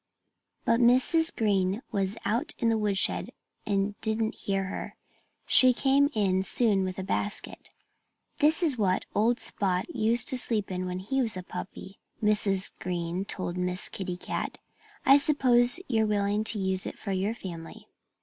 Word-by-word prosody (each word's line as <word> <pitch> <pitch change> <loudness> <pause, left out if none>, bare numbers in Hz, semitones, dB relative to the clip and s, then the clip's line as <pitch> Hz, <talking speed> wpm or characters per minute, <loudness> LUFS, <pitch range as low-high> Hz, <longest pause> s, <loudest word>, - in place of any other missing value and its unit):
But 230 0 +2
Mrs. 260 +7 +4
Green 200 0 0
was 195 +1 -2
out 235 +9 -1
in 230 - +1
the 225 - +1
woodshed 200 -2 +1 0.4
and 200 0 0
didn't 220 +1 -1
hear 195 -1 -2
her. 190 - -6 0.5
She 255 -1 +5
came 280 +2 +3
in 190 -3 +1
soon 200 -1 +2
with 185 -1 -4
a 190 - -4
basket. 195 +1 -3 0.7
"This 315 +4 +3
is 285 -8 0
what 190 -3 0
old 235 +3 +1
Spot 185 -2 -1
used 230 +2 +2
to 260 - +5
sleep 215 -5 0
in 185 0 -3
when 180 0 -4
he 240 +9 -2
was 225 -6 -1
a 185 - -6
puppy," 190 +1 -9 0.2
Mrs. 210 -3 +1
Green 175 +1 -3
told 185 -2 -4
Miss 180 0 +3
Kitty 180 -2 -5
Cat. - - -5 0.5
"I 275 - +7
suppose 255 -2 +3
you're 220 -3 +1
willing 205 0 0
to 220 - +3
use 190 -1 0
it - - -7
for 200 - -6
your 195 +4 -1
family." 170 -7 -9
205 Hz, 160 wpm, -27 LUFS, 190-235 Hz, 0.7 s, I